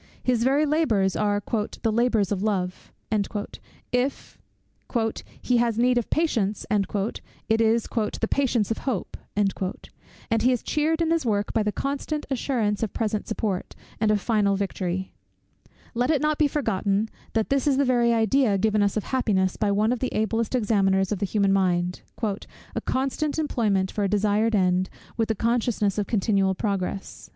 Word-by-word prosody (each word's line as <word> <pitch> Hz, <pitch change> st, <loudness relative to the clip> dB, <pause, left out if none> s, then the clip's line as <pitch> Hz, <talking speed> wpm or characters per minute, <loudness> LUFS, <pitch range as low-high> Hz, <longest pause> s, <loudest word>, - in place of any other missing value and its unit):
His 245 Hz, -2 st, +2 dB
very 275 Hz, +4 st, +3 dB
labours 230 Hz, -, +2 dB
are 205 Hz, -1 st, 0 dB, 0.4 s
"the 225 Hz, -, +2 dB
labours 225 Hz, -3 st, +2 dB
of 195 Hz, -2 st, 0 dB
love;" 185 Hz, -4 st, -2 dB, 1.0 s
if 250 Hz, +3 st, -2 dB, 1.0 s
"he 250 Hz, -, +2 dB
has 235 Hz, -2 st, +1 dB
need 245 Hz, +1 st, +3 dB
of 235 Hz, -, -5 dB
patience," 225 Hz, -11 st, 0 dB
it 210 Hz, +2 st, -1 dB
is 225 Hz, 0 st, +3 dB
"the 225 Hz, -1 st, -2 dB
patience 245 Hz, -6 st, +1 dB
of 225 Hz, -, 0 dB
hope;" 245 Hz, -9 st, -3 dB, 0.2 s
and 200 Hz, +2 st, -3 dB
he 250 Hz, +3 st, +4 dB
is 250 Hz, -, -1 dB
cheered 315 Hz, +2 st, 0 dB
in 325 Hz, -, 0 dB
his 330 Hz, -1 st, +2 dB
work 205 Hz, -4 st, 0 dB
by 225 Hz, -, +2 dB
the 210 Hz, 0 st, 0 dB
constant 285 Hz, +5 st, -3 dB
assurance 230 Hz, -5 st, 0 dB
of 225 Hz, -, -2 dB
present 215 Hz, -2 st, -2 dB
support, 210 Hz, -4 st, -3 dB, 0.2 s
and 215 Hz, -1 st, +2 dB
of 210 Hz, -1 st, +3 dB
final 205 Hz, -2 st, +2 dB
victory. 190 Hz, -1 st, -3 dB, 0.8 s
Let 245 Hz, +2 st, 0 dB
it 310 Hz, -3 st, +3 dB
not 300 Hz, +1 st, 0 dB
be 300 Hz, -, +5 dB
forgotten, 210 Hz, -7 st, 0 dB, 0.3 s
that 220 Hz, +2 st, 0 dB
this 275 Hz, +1 st, +2 dB
is 275 Hz, -2 st, +3 dB
the 280 Hz, -, +3 dB
very 240 Hz, -2 st, +3 dB
idea 225 Hz, -1 st, +3 dB
given 215 Hz, +1 st, +2 dB
us 205 Hz, +1 st, +1 dB
of 215 Hz, -, -1 dB
happiness 195 Hz, -8 st, +1 dB
by 210 Hz, -, 0 dB
one 210 Hz, +3 st, +2 dB
of 250 Hz, -, -1 dB
the 255 Hz, -, -2 dB
ablest 225 Hz, +2 st, 0 dB
examiners 195 Hz, -4 st, +2 dB
of 205 Hz, -, -1 dB
the 200 Hz, -, 0 dB
human 200 Hz, 0 st, +2 dB
mind; 180 Hz, -2 st, +1 dB, 0.2 s
"a 205 Hz, -2 st, -4 dB
constant 275 Hz, +3 st, -1 dB
employment 215 Hz, -11 st, +1 dB
for 210 Hz, -, -2 dB
a 200 Hz, -, +1 dB
desired 210 Hz, +2 st, +2 dB
end, 185 Hz, -1 st, +2 dB, 0.3 s
with 225 Hz, -1 st, 0 dB
the 220 Hz, -, 0 dB
consciousness 225 Hz, -2 st, 0 dB
of 205 Hz, -, -1 dB
continual 195 Hz, -3 st, +1 dB
progress." 195 Hz, -2 st, -3 dB
220 Hz, 165 wpm, -25 LUFS, 200-245 Hz, 1.0 s, be